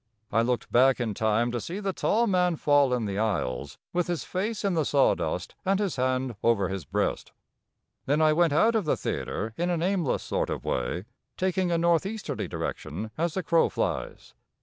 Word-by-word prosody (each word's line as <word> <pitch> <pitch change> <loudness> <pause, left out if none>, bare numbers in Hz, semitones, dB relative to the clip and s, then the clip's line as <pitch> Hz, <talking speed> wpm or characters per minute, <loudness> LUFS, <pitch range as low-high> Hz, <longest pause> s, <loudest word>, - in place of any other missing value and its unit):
I 115 - +3
looked 120 +1 -1
back 130 +2 +5
in 115 -3 -1
time 110 +3 +1
to 120 -1 -2
see 180 - -5
the 195 -2 -2
tall 230 +5 +2
man 180 -4 +2
fall 145 -3 +3
in 125 -3 0
the 100 0 -2
aisles 70 - -2 0.2
with 175 0 +1
his 175 -2 -2
face 205 +3 -3
in 195 - +2
the 160 -2 +2
sawdust 140 -2 +1
and 195 +1 +1
his 200 -8 -1
hand 130 -1 0
over 110 -5 +2
his 95 -5 -4
breast. - - -2 0.7
Then 145 +3 +2
I 155 -1 +5
went 170 0 +3
out 220 +11 +4
of 220 -5 +1
the 150 - +1
theatre 110 +1 -3
in 175 +1 0
an 170 -2 0
aimless 180 -6 0
sort - - -1
of - - -4
way, 85 +10 -2 0.3
taking 185 -1 0
a 170 - +2
northeasterly 170 +6 0
direction 105 +8 -5
as 165 0 -1
the 190 - -1
crow 165 +1 +3
flies. - - -3
155 Hz, 195 wpm, -27 LUFS, 115-180 Hz, 0.7 s, back